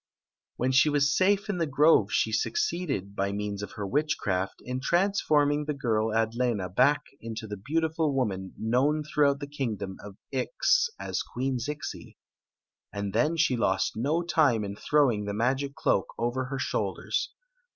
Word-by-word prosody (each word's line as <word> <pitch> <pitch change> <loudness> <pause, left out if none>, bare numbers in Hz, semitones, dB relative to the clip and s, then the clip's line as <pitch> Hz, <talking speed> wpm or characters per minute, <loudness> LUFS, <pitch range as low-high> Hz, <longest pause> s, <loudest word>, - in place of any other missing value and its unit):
When 130 +2 0
she 130 +4 +5
was 145 +1 +2
safe 200 +2 +2
in 200 -4 -2
the 165 - +1
grove 150 +4 +4
she - - +1
succeeded, 160 - -1
by 100 0 0
means 100 0 -3
of 100 - -7
her 105 -3 -5
witchcraft, 100 -8 -1
in 125 +1 -3
transforming 150 -5 +2
the 150 -1 -2
girl 110 -5 0
Adlena 110 -3 0
back 145 +6 +4 0.2
into 115 0 -6
the 105 -1 -5
beautiful 160 - 0
woman 100 -8 -2
known 135 +7 +1
through 150 -1 +2
out 140 0 -1
the - - -3
kingdom 115 -9 -4
of 100 -1 -10
Ix - - +2
as - - -2
Queen 130 +1 -3
Zixi. 150 +5 -6 0.7
And 100 -1 -4
then 155 +9 +2
she 160 -5 +3
lost 95 -5 0
no 150 +9 0
time 150 -10 +2
in 100 0 -5
throwing 120 -5 +2
the 100 0 -3
magic 135 +5 0
cloak - - +1
over 120 +2 -1
her 135 +1 -4
shoulders. - - -2
130 Hz, 160 wpm, -28 LUFS, 110-150 Hz, 0.7 s, she